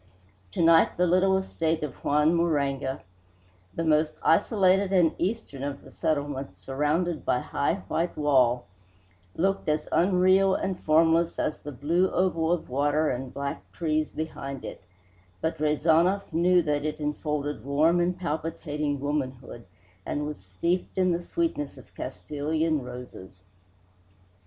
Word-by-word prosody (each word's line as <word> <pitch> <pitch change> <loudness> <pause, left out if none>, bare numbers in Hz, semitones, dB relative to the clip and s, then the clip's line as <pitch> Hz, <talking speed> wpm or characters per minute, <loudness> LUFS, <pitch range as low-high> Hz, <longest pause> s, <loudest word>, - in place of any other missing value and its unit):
To - - 0
night 165 0 +5
the 180 - +3
little 185 +2 +3
estate 165 -4 -1
of 145 -4 -3
Juan 150 +3 +3
Moraga, 140 -5 0 0.7
the 165 - -1
most 155 -1 +2
isolated 195 +1 +3
and 175 -4 +4
eastern 185 - -3
of 140 0 -4
the - - -14
settlement, 145 -3 -2
surrounded 150 +5 -1
by - - +1
its - - -12
high 140 +4 +1
white 170 +1 -1
wall, 130 -5 +3 0.7
looked 195 -1 0
as 150 0 0
unreal 185 +1 +4
and 190 -2 -2
formless 165 +2 +3
as 150 - -1
the 145 - -8
blue 165 +8 +1
oval 170 -3 +1
of 175 -2 -1
water 145 +4 +1
and 130 +1 -4
black 140 +2 -4
trees 155 -2 -1
behind 140 -4 -6
it, - - -8 0.6
but 160 -1 -2
Rezanov 165 +5 +2
knew 175 +2 +4
that 145 -2 0
it 155 0 -3
enfolded 150 0 -3
warm 155 +5 +3
and 175 +1 0
palpitating 150 -3 -3
womanhood 130 -4 -4 0.4
and 145 +8 -3
was 150 0 -5
steeped 95 - -2
in 185 -1 +3
the 170 0 -1
sweetness 175 - -2
of - - -16
Castilian 150 - -2
roses. 120 -7 -10
155 Hz, 140 wpm, -27 LUFS, 145-175 Hz, 0.7 s, night